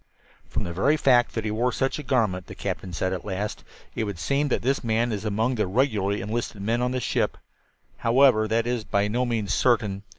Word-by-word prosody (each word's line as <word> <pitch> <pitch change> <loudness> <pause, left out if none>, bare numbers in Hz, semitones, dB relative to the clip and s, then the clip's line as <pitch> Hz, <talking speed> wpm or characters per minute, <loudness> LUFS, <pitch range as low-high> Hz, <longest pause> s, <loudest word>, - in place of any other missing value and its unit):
"From - - -3
the 85 - -4
very 140 - +2
fact 125 -4 +3
that 115 -1 -2
he 105 - -1
wore 120 +4 +1
such 135 +4 -1
a - - -3
garment," 110 -10 0
the - - -9
captain 95 - -4
said 95 +3 -1
at 90 - -4
last, 105 +1 -4 0.3
"it - - -2
would 100 -3 -5
seem 140 - 0
that 130 - -1
this 135 +3 0
man 115 +1 +1
is 105 0 -3
among 110 +4 0
the 110 -5 0
regularly 105 -2 +1
enlisted 110 +1 -3
men 115 +3 0
on 125 - +1
this 130 0 -2
ship. - - 0 0.6
However, 120 -2 +4
that 115 +1 +1
is 120 -2 -1
by 100 -1 +1
no 120 +4 0
means 110 -4 -1
certain. 105 -6 +1
115 Hz, 220 wpm, -25 LUFS, 100-125 Hz, 0.6 s, However